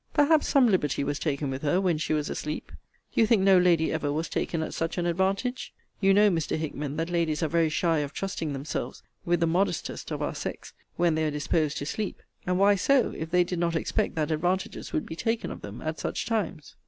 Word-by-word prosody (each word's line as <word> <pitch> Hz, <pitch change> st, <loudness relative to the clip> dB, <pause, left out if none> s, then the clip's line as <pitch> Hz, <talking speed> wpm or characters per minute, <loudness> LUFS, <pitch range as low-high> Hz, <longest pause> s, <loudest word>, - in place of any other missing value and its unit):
Perhaps 295 Hz, +1 st, +4 dB
some 275 Hz, -3 st, +5 dB
liberty 165 Hz, -, +1 dB
was 145 Hz, +1 st, -2 dB
taken 145 Hz, -2 st, -1 dB
with 130 Hz, +1 st, -4 dB
her 155 Hz, +5 st, +2 dB
when 180 Hz, -5 st, +1 dB
she 155 Hz, -, -2 dB
was 150 Hz, -1 st, +1 dB
asleep. 150 Hz, 0 st, -4 dB, 0.4 s
Do -, -, +3 dB
you 225 Hz, -, +5 dB
think 215 Hz, -4 st, +4 dB
no 190 Hz, -1 st, +6 dB
lady 170 Hz, -3 st, +3 dB
ever 155 Hz, -2 st, -1 dB
was 160 Hz, +3 st, -2 dB
taken 165 Hz, -2 st, -1 dB
at -, -, -5 dB
such 165 Hz, +2 st, -2 dB
an 175 Hz, -, 0 dB
advantage? 195 Hz, +8 st, -1 dB, 0.2 s
You 195 Hz, -1 st, +4 dB
know, 205 Hz, +1 st, +5 dB
Mr. 165 Hz, -3 st, -1 dB
Hickman, 150 Hz, -2 st, -4 dB
that 165 Hz, +2 st, -2 dB
ladies 165 Hz, -3 st, 0 dB
are -, -, +2 dB
very 165 Hz, +1 st, +2 dB
shy 165 Hz, 0 st, +1 dB
of 145 Hz, -1 st, -3 dB
trusting 165 Hz, -5 st, -3 dB
themselves 135 Hz, -2 st, -4 dB, 0.2 s
with 175 Hz, -1 st, +1 dB
the -, -, +4 dB
modestest 180 Hz, +5 st, -1 dB
of -, -, -3 dB
our -, -, -2 dB
sex, -, -, -6 dB, 0.2 s
when 170 Hz, -1 st, +2 dB
they 160 Hz, 0 st, 0 dB
are -, -, +1 dB
disposed 150 Hz, +1 st, 0 dB
to 145 Hz, -, -3 dB
sleep; 210 Hz, +6 st, -4 dB, 0.2 s
and 180 Hz, 0 st, +1 dB
why 200 Hz, +2 st, +5 dB
so, 260 Hz, +6 st, +2 dB
if 160 Hz, -, -5 dB
they 180 Hz, +1 st, +4 dB
did 175 Hz, 0 st, -4 dB
not 170 Hz, -1 st, 0 dB
expect 160 Hz, -, -1 dB
that 155 Hz, -1 st, -1 dB
advantages 180 Hz, +5 st, -1 dB
would -, -, -1 dB
be 160 Hz, -, -7 dB
taken 225 Hz, +5 st, -1 dB
of -, -, -8 dB
them 105 Hz, +2 st, -8 dB
at 155 Hz, 0 st, -3 dB
such -, -, -3 dB
times? 205 Hz, -9 st, -3 dB
165 Hz, 230 wpm, -27 LUFS, 155-190 Hz, 0.4 s, no